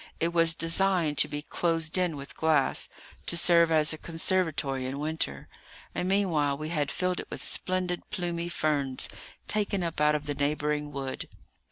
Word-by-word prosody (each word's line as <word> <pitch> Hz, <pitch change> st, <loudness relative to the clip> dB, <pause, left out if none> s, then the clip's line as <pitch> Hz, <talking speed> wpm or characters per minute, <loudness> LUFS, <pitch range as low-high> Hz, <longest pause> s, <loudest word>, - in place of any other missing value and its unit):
It 165 Hz, -, +1 dB
was 165 Hz, -1 st, +4 dB
designed 165 Hz, -2 st, +2 dB
to -, -, +6 dB
be 145 Hz, 0 st, -5 dB
closed 165 Hz, -1 st, 0 dB
in 180 Hz, -5 st, +1 dB
with 140 Hz, 0 st, -9 dB
glass, 155 Hz, -4 st, +2 dB, 0.4 s
to 170 Hz, -, +2 dB
serve 170 Hz, -1 st, +5 dB
as 155 Hz, -1 st, +4 dB
a 155 Hz, -, -8 dB
conservatory 160 Hz, -6 st, 0 dB
in 135 Hz, +2 st, -4 dB
winter; 150 Hz, -, -3 dB, 0.5 s
and 180 Hz, -, -2 dB
meanwhile 160 Hz, -8 st, +1 dB
we 155 Hz, +1 st, -5 dB
had 150 Hz, -4 st, 0 dB
filled 180 Hz, 0 st, -1 dB
it -, -, -7 dB
with -, -, -6 dB
splendid 185 Hz, -1 st, -2 dB
plumy 175 Hz, -3 st, -3 dB
ferns, 145 Hz, -6 st, 0 dB, 0.4 s
taken 205 Hz, -3 st, 0 dB
up 165 Hz, -3 st, -3 dB
out 150 Hz, 0 st, +4 dB
of 150 Hz, -1 st, -3 dB
the 145 Hz, -, -2 dB
neighbouring 150 Hz, +1 st, -1 dB
wood. 135 Hz, -2 st, -5 dB
160 Hz, 170 wpm, -28 LUFS, 145-175 Hz, 0.5 s, to